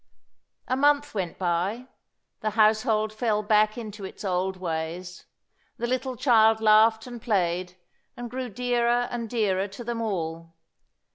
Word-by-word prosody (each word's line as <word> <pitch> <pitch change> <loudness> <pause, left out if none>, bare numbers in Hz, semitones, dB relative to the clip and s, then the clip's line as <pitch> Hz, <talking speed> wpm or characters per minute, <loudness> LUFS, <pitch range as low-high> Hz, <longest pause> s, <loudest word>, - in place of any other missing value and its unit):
A 255 - +1
month 290 +1 +2
went 185 -5 -3
by. 185 +7 -1 0.5
The 215 - -1
household 215 0 +2
fell 215 -2 0
back 215 +1 +3
into 210 -3 -7
its 190 - -8
old 185 0 -1
ways. 170 +1 -5 0.5
The 235 - -2
little 255 +1 -2
child 225 -3 +4
laughed 220 +1 +4
and 240 -2 -9
played, 180 -4 -1 0.4
and 245 - -5
grew 250 +1 -5
dearer 245 +1 +1
and 235 -2 -4
dearer 200 -4 0
to 200 +4 -9
them 235 0 -3
all. 165 -5 -4
215 Hz, 140 wpm, -26 LUFS, 190-240 Hz, 0.5 s, child